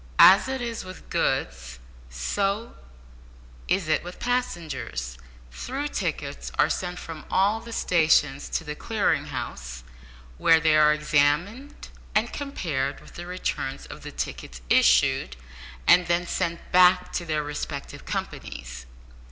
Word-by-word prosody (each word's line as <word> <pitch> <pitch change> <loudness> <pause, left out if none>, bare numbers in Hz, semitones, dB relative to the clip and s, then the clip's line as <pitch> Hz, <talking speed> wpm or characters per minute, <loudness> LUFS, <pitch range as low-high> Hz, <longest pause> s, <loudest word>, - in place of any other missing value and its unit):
As 195 +6 +8
it 265 -1 -3
is 230 -1 -4
with 185 0 -11
goods, 65 -1 -1 0.3
so 195 - -2 0.9
is 180 -1 +1
it 155 - +1
with 175 +1 -8
passengers. 170 - -3 0.4
Through 270 - -4
tickets - - -4
are - - +4
sent 180 -1 -3
from 160 -3 -8
all 200 +4 +2
the 230 0 -10
stations 155 -8 +2
to - - -2
the 150 -2 -5
Clearing 175 -5 0
House, 65 - -6 0.6
where 165 -1 +6
they 160 -1 +3
are 150 0 +6
examined 150 - 0 0.3
and 220 +3 +1
compared 155 - -3
with - - -16
the 175 0 -8
returns 180 -6 -3
of - - -10
the - - -8
tickets - - -5
issued, 60 +1 +4 0.5
and 180 -1 +6
then 175 0 +1
sent 170 0 -3
back 180 0 +5
to - - -1
their 155 -2 -1
respective 145 -1 -6
companies. - - -6
165 Hz, 135 wpm, -25 LUFS, 145-195 Hz, 0.9 s, As